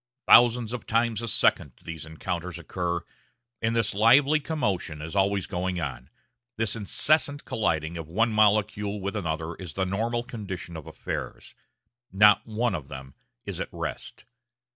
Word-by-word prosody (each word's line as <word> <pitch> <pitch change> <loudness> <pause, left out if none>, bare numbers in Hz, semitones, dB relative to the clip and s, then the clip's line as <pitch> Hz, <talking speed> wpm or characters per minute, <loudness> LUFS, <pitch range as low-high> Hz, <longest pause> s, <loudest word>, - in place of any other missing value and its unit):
Thousands 120 -1 +6
of 125 - -6
times 115 -1 +1
a 115 - -4
second 70 - +2
these 80 -1 -7
encounters 85 +2 -4
occur, 85 0 -3 0.6
and 115 +1 0
this 115 - +1
lively 135 +9 +5
commotion 105 - -2
is 80 +4 -7
always 100 -1 +2
going 90 0 -2
on, 65 -4 -5 0.5
this 110 -1 0
incessant 145 - +2
colliding 80 -6 -1
of 80 -2 -6
one 115 +8 +1
molecule 105 -1 +2
with 100 +2 -4
another 80 -4 -3
is 90 -6 -9
the 95 - 0
normal 115 +5 -1
condition 95 -7 -7
of 80 -3 -8
affairs; - - -6 0.6
not 105 +2 +5
one 115 +2 0
of 70 -3 -5
them 65 -1 -9 0.3
is - - -5
at - - -3
rest. - - -6
100 Hz, 150 wpm, -26 LUFS, 85-115 Hz, 0.6 s, Thousands